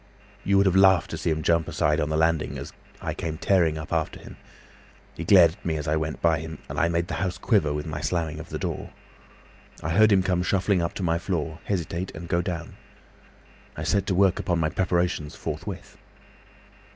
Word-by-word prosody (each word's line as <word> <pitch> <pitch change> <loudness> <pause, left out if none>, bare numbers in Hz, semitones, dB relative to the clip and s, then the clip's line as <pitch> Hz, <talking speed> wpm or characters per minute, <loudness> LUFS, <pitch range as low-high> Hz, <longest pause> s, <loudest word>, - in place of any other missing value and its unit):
You 100 0 +3
would 100 - +4
have 95 -1 +3
laughed 95 -3 +5
to - - -3
see - - -1
him 80 -1 -1
jump 85 0 +2
aside 75 +2 +1
on 75 - 0
the 80 - 0
landing 80 -1 +1
as - - -8 0.3
I - - -2
came 80 -1 -4
tearing 85 -4 +2
after 80 0 -2
him. - - -12 0.8
He 85 - -6
glared 85 -2 +7
at 100 +5 -17
me 80 -2 -1
as 75 +1 -5
I 75 - +2
went 80 0 -3
by 80 -2 +3
him, 80 0 -7
and - - -4
I 85 - +3
made 85 0 0
the - - -5
house 95 -2 -1
quiver 100 -11 +2
with 75 0 -3
the 75 -2 -5
slamming 80 -1 -2
of - - -10
my - - -2
door. - - -4 0.9
I 80 - -2
heard 110 +5 +5
him 95 -2 +4
come 90 -1 +1
shuffling 95 +1 +1
up 85 - -2
to 95 - -4
my 85 -1 +1
floor, 80 -3 -3
hesitate, 90 -1 -2
and 85 - -7
go 85 +1 +1
down. 85 -2 -5 1.0
I 80 - -4
set 100 +5 +1
to 95 - +1
work 95 0 +3
upon 85 - 0
my 80 -2 +1
preparations 85 -3 -1
forthwith. - - -6
85 Hz, 210 wpm, -25 LUFS, 80-95 Hz, 1.0 s, glared